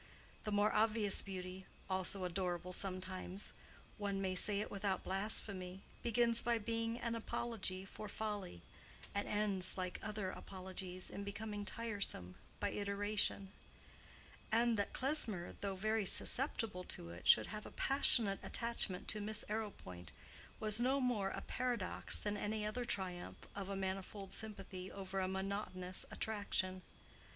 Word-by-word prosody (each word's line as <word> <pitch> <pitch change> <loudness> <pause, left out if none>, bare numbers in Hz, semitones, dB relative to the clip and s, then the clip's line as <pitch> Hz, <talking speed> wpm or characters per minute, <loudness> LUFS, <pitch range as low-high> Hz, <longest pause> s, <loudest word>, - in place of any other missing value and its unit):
The 210 - -1
more 205 +1 +3
obvious 215 -2 +3
beauty, 185 -1 -6 0.2
also 185 0 0
adorable 180 0 -2
sometimes—one 190 +2 -1
may 190 -1 0
say 200 +2 +4
it 210 - -3
without 195 -2 -1
blasphemy—begins 205 +4 +2
by 235 -1 +2
being 230 +1 -1
an 235 -1 -2
apology 220 -4 -1
for 210 +2 -7
folly, 205 - -4 0.5
and 200 - -1
ends 200 -3 0
like 185 -1 -2
other 210 -3 -2
apologies 185 -1 -4
in 200 - -4
becoming 205 0 -4
tiresome 205 - -1 0.3
by 205 -1 0
iteration; 200 -1 0 1.0
and 230 +1 +4
that 200 -1 0
Klesmer, 245 - +1
though 195 -1 -1
very 215 +1 +1
susceptible 225 -6 +1
to 85 - -3
it, 85 +1 -7
should - - +8
have 215 0 -5
a - - -10
passionate 235 -7 +4
attachment 230 -6 0
to 210 - +1
Miss 215 +1 0
Arrowpoint, 200 - -4 0.5
was 215 0 +2
no 265 +3 +3
more 235 -7 +1
a - - -4
paradox 240 -7 +2
than 205 0 -1
any 210 +1 -1
other 240 +4 -2
triumph 180 -5 -2 0.2
of 200 -1 -4
a 200 - -2
manifold 195 +1 -3
sympathy 195 -4 -3
over 195 0 -4
a 185 - +1
monotonous 190 -1 -1
attraction. 195 -3 -1
200 Hz, 135 wpm, -38 LUFS, 185-215 Hz, 1.0 s, should